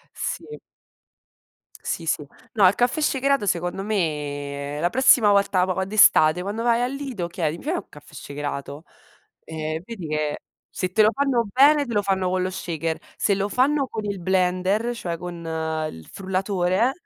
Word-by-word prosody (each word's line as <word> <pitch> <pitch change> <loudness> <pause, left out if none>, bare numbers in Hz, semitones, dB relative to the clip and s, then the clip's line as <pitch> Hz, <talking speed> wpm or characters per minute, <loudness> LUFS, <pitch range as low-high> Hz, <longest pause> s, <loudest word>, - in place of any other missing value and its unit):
Sì. 450 - -5 1.2
Sì, 165 - -4
sì. 150 -2 -1 0.3
No, 205 -4 +5
il 185 - +5
caffè 245 +5 +1
shakerato 275 -5 +1
secondo 175 +2 -1
me 145 -7 -3
la 175 +2 +1
prossima 255 -3 +5
volta 200 -2 +3
po 190 0 -1
d'estate 180 -5 +5
quando 205 +4 -3
vai 235 0 +2
al 250 - -1
Lido, 265 -11 -4
chiedi: 165 -2 -2
"Mi - - -13
fai 315 +5 -1
un - - -5
caffè 145 0 -16
shakerato?" 145 +1 -6 0.6
Eh 155 -1 -4
e 160 - -6
vedi 195 -8 -7
che, 150 -1 -1 0.3
se 185 -1 -4
te 215 - +5
lo 215 - +5
fanno 265 -5 +1
bene, 285 +5 +5
te 235 - -4
lo 205 - +2
fanno 190 -2 0
con 185 0 0
lo 185 - -1
shaker. 165 -3 -3 0.2
Se 200 - +2
lo 200 +1 -1
fanno 275 +4 +2
con 220 -3 -5
il 200 -3 -3
blender, 185 +5 +1
cioè 175 -7 -4
con 175 0 -7 0.5
il 80 -1 -12
frullatore, 190 +3 0
190 Hz, 170 wpm, -23 LUFS, 165-230 Hz, 1.2 s, No